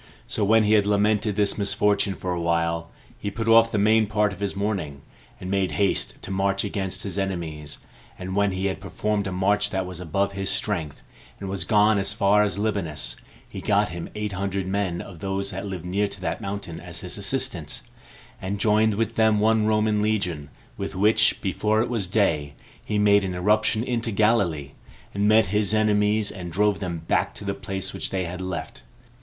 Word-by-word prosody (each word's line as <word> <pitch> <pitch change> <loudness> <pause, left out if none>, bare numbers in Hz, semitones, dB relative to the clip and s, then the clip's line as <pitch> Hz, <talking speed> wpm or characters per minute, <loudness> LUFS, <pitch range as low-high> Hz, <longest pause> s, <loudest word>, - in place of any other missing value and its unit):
So 110 - -2
when 110 +2 +5
he 105 +1 +3
had 105 -2 +4
lamented 105 0 +2
this 105 0 +1
misfortune 100 -1 +1
for 90 -1 -3
a 85 - -2
while, 85 0 0 0.3
he 100 - -3
put 115 +2 -4
off 115 0 +6
the - - 0
main 110 +1 +4
part 105 -1 +1
of 95 - -11
his 100 -1 -2
mourning, 95 -9 -3 0.4
and 90 - -5
made 95 -2 0
haste 100 -1 +1
to - - -5
march 100 +1 +1
against 95 -2 -1
his 100 0 -3
enemies; 80 -6 -4 0.4
and 95 +1 -5
when 100 0 +2
he 95 +1 -2
had 95 - -2
performed 105 -2 -2
a - - -3
march 100 +3 +1
that 95 -2 -2
was 90 -2 -8
above 100 +4 -1
his 95 0 -3
strength, 85 -9 -2 0.4
and 95 - -5
was 95 0 -3
gone 105 -1 +4
as 100 +1 +1
far 105 0 +4
as 105 -1 0
Libanus, 85 - -2 0.3
he - - -8
got - - +2
him 85 0 -6
eight 105 -1 -3
hundred 95 0 -2
men 95 -2 -1
of 90 -4 -10
those 95 +1 -2
that 95 +1 -5
lived 90 -3 -6
near 100 +3 0
to 100 - -5
that - - -3
mountain 100 -4 -5
as - - -7
his - - -4
assistants, - - -2 0.6
and 100 +2 -3
joined 110 +1 +3
with 115 +1 -2
them 110 -1 +4
one 110 0 +3
Roman 105 -1 +2
legion, 90 -9 -1 0.3
with - - -5
which, 110 +3 +3
before 105 +2 +1
it 125 - -4
was 110 -6 -1
day, 80 -8 +1 0.3
he 105 - -2
made 100 -1 +4
an 95 -2 -3
irruption 110 +4 +2
into 120 -2 -2
Galilee, 100 -10 +1 0.4
and 100 +1 +1
met 110 -2 +5
his 105 0 +2
enemies, 105 0 +2
and 90 -2 -7
drove 105 +3 +2
them 85 -4 -4
back - - +1
to - - -6
the 100 - -1
place 95 0 -4
which - - -3
they 95 -1 -1
had 90 +2 -6
left. 95 +7 -5
100 Hz, 200 wpm, -24 LUFS, 95-105 Hz, 0.6 s, off